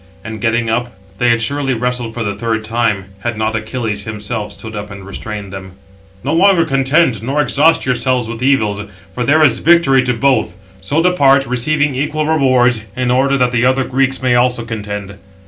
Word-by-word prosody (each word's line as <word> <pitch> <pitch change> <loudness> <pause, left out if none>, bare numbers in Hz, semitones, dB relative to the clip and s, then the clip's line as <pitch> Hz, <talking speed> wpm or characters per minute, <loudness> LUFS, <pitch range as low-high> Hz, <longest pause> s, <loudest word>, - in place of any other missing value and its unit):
And, 110 -1 -7
getting 115 0 0
up, 120 +2 -1 0.3
they 120 - +2
had 115 -1 +2
surely 135 +1 -1
wrestled 125 -1 -3
for 120 - -3
the 100 -2 -2
third 110 +1 -3
time, 110 -4 -1
had 115 +1 -3
not 110 0 -1
Achilles 110 -2 -3
himself 105 0 -5
stood 110 0 -9
up 105 0 -6
and 100 -2 -10
restrained 100 0 -7
them: 95 -1 -9 0.5
"No 140 +4 -1
longer 180 0 +4
contend, 135 - +1
nor 135 +6 -2
exhaust 150 +2 +3
yourselves 125 -1 0
with 115 0 -7
evils; 110 -7 +1 0.3
for 125 - -2
there 155 +4 +3
is 145 - +3
victory 155 -5 +4
to 125 -1 0
both: 135 +2 +1 0.3
so 155 +9 0
depart, 140 -7 +4
receiving 145 +4 0
equal 150 +3 -2
rewards, 130 -7 +2
in 125 -1 0
order 135 +2 +2
that 125 -2 +1
the 120 -1 +1
other 130 +1 +2
Greeks 130 0 -1
also 125 -1 +2
may - - -13
contend." 105 -2 -6
125 Hz, 185 wpm, -16 LUFS, 110-135 Hz, 0.5 s, longer